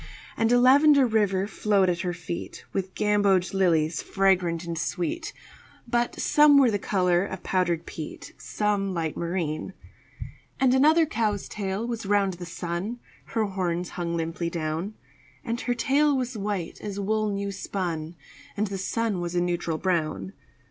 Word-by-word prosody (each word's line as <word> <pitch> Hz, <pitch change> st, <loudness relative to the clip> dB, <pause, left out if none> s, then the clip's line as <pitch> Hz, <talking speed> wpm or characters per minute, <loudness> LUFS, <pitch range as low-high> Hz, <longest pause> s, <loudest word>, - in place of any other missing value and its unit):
And 225 Hz, 0 st, +1 dB
a 245 Hz, -, +5 dB
lavender 280 Hz, +2 st, +6 dB
river 205 Hz, -4 st, +1 dB
flowed 200 Hz, -1 st, +1 dB
at 175 Hz, -1 st, 0 dB
her 180 Hz, -1 st, -1 dB
feet 175 Hz, -1 st, -6 dB
With 190 Hz, -1 st, -3 dB
gamboge 200 Hz, -3 st, +2 dB
lilies 165 Hz, -5 st, +2 dB
fragrant 180 Hz, -4 st, +1 dB
and 170 Hz, -1 st, -4 dB
sweet, 180 Hz, -, -3 dB, 0.6 s
But 240 Hz, 0 st, 0 dB
some 295 Hz, -1 st, +6 dB
were 265 Hz, -4 st, +5 dB
the 205 Hz, -, 0 dB
color 180 Hz, -3 st, +2 dB
of 190 Hz, -2 st, -6 dB
powdered 175 Hz, -3 st, 0 dB
peat, 155 Hz, -2 st, -8 dB
Some 200 Hz, -2 st, -1 dB
light 160 Hz, -2 st, -2 dB
marine. 170 Hz, 0 st, -3 dB, 0.9 s
And 260 Hz, -1 st, +4 dB
another 310 Hz, +5 st, +5 dB
cow's 215 Hz, -9 st, -1 dB
tail 200 Hz, +1 st, -3 dB
was 230 Hz, -4 st, -4 dB
round 200 Hz, -2 st, +2 dB
the 175 Hz, 0 st, -8 dB
sun 175 Hz, +7 st, -4 dB, 0.3 s
(Her 220 Hz, -1 st, -1 dB
horns 180 Hz, -3 st, -2 dB
hung 170 Hz, -1 st, -3 dB
limply 165 Hz, +1 st, -2 dB
down); 165 Hz, +5 st, -3 dB, 0.5 s
And 235 Hz, 0 st, -2 dB
her 245 Hz, -, -1 dB
tail 285 Hz, +3 st, +2 dB
was 250 Hz, -1 st, -3 dB
white 200 Hz, -4 st, -3 dB
as 205 Hz, -1 st, -5 dB
wool 215 Hz, +1 st, 0 dB
new 200 Hz, 0 st, -2 dB
spun, 175 Hz, -4 st, -4 dB, 0.4 s
And 210 Hz, -, +1 dB
the 195 Hz, -2 st, -4 dB
sun 210 Hz, -1 st, -1 dB
was 175 Hz, 0 st, -4 dB
a -, -, +3 dB
neutral 175 Hz, -2 st, -1 dB
brown. 155 Hz, -, -1 dB
195 Hz, 155 wpm, -26 LUFS, 175-220 Hz, 0.9 s, lavender